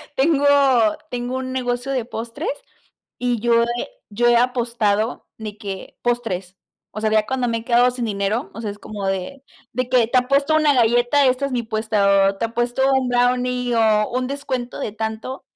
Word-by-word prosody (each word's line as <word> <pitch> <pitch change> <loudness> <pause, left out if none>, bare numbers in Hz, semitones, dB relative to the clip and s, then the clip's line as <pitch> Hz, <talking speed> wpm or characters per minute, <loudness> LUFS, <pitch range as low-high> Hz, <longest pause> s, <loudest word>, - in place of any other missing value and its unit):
tengo 285 +1 +2 0.6
tengo 245 +1 -3
un 260 0 -4
negocio 245 0 -2
de 255 -4 -1
postres, 240 - -5 0.7
y 245 -2 -1
yo 235 +2 +1
he 240 - -3 0.2
yo 240 +4 +1
he 240 0 +5
apostado, 235 -3 0
de 215 -1 -7
que, 195 -2 -7
postres. 195 -7 -2 0.4
O - - -3
sea, 215 0 +1
ya 215 -1 +3
cuando 255 -1 -1
me 230 - 0
he 225 - -8
quedado 245 +1 +4
sin 245 -1 -3
dinero, 205 +2 -2
o 230 - -7
sea, 215 - -3
es 205 - -12
como 205 -2 -6
de 195 +9 -4 0.3
de 255 +1 -2
que 245 -3 +3
te 255 - +2
apuesto 280 +4 +2
una 305 -2 +4
galleta, 240 +3 +3
esta 255 +2 +1
es 275 - -4
mi 245 -2 -1
puesta, 210 -3 +2
o 195 - -5
te 230 - -1
apuesto 240 +3 -1
un 260 -2 +1
brownie, 250 0 +1
o 215 -2 +3
un 255 0 -1
descuento 260 -3 -4
de - - -3
tanto. 220 +4 -5
240 Hz, 190 wpm, -21 LUFS, 220-255 Hz, 0.7 s, he